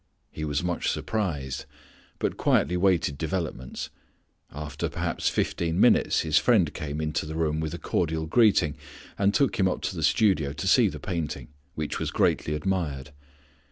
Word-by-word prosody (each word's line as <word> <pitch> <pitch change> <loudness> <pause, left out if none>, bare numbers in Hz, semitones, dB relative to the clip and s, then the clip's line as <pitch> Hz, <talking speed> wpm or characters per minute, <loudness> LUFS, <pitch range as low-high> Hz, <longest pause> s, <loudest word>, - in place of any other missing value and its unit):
He 80 - -6
was 75 +2 -1
much 90 -1 -1
surprised, 80 -12 -2 0.5
but - - -1
quietly 90 - +2
waited 90 -6 +2
developments. 80 -6 -4 0.6
After 75 0 -4
perhaps - - -1
fifteen 85 +1 -1
minutes 120 - +4
his 80 -2 +3
friend 100 -11 +3
came 75 -2 -4
into 75 0 -2
the 80 - -5
room 80 -1 0
with 80 +1 -3
a - - -5
cordial 80 -1 -1
greeting, 100 -5 +4 0.5
and 100 0 +4
took 135 +2 +1
him 95 - +4
up 90 - -2
to - - -2
the 80 - -4
studio 80 -4 +2
to 70 - -4
see - - +5
the - - -5
painting, 85 -5 -4 0.3
which 75 -1 -3
was - - -2
greatly 75 - +1
admired. 75 -5 -2
80 Hz, 160 wpm, -26 LUFS, 75-95 Hz, 0.6 s, see